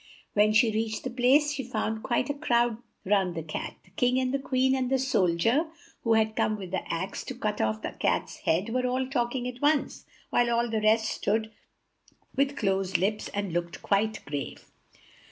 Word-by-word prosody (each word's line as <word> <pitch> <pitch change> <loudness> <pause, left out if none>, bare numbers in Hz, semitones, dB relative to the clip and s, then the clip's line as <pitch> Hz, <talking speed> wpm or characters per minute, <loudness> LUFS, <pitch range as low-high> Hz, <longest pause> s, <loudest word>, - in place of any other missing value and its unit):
When 210 +1 +4
she 225 +1 +4
reached 220 0 -2
the 260 - -3
place, 265 +5 +4
she 270 -2 -3
found 220 -2 -2
quite 245 +1 0
a - - -2
crowd 240 -5 +1 0.3
round 190 -3 +2
the 165 - -3
Cat. 155 - -5
The 190 - -24
King 245 +6 +1
and 255 0 0
the 275 - +1
Queen 260 0 +1
and 260 -2 0
the 265 - +3
sol 200 -10 +2
dier 240 - +2 0.4
who 230 -1 +3
had 220 0 +2
come 215 - +1
with 190 -3 -8
the 190 - -3
axe, 185 +4 -3
to 260 - -6
cut 210 -4 -2
off 110 0 -1
the - - -3
Cat's - - -1
head, 180 +7 0
were 250 +2 0
all 255 +1 0
talking 245 -1 -1
at 250 0 -7
once, 290 0 +1 0.2
while 240 0 +3
all 235 0 +1
the 220 -1 0
rest 220 +1 +4
stood 220 0 -1 0.8
with 275 +1 +1
closed 195 -2 +1
lips 210 +3 -1
and 200 -4 -3
looked 170 0 -3
quite 215 +2 0
grave. 140 -2 -6
225 Hz, 200 wpm, -28 LUFS, 200-255 Hz, 0.8 s, When